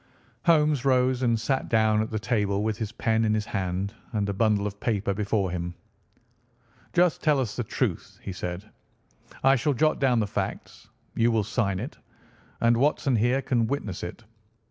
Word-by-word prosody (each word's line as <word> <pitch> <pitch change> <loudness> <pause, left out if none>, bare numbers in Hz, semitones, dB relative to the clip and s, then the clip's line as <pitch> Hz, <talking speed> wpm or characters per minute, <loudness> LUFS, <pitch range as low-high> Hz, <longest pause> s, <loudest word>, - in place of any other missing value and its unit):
Holmes 150 -5 +4
rose 130 -1 +2
and 115 -3 +2
sat 135 +4 -1
down 110 -1 +3
at 110 - -2
the 110 - -2
table 105 -3 0
with 110 0 0
his 110 -2 -3
pen 110 -1 +1
in 110 -1 +2
his 105 -1 -1
hand 95 0 -2 0.2
and 105 -2 0
a 100 - -1
bundle 105 0 +2
of 100 0 -5
paper 100 -3 0
before 100 -2 0
him. 85 0 -4 1.2
"Just 175 -1 +2
tell 150 -3 +3
us 120 -5 -2
the 120 - -2
truth," - - -3
he - - -4
said. 90 +2 -5 0.8
"I 135 +1 +6
shall 135 +3 0
jot 155 +5 +2
down 125 -3 +3
the 110 - +1
facts. 100 - -5 0.2
You 115 +1 +2
will 110 -2 +2
sign 100 -3 -1
it, 125 +9 -7 0.6
and 115 0 +4
Watson 140 0 +2
here 125 +5 +2
can 120 -4 +1
witness 110 -8 -3
it. 90 +7 -7
110 Hz, 180 wpm, -26 LUFS, 100-130 Hz, 1.2 s, I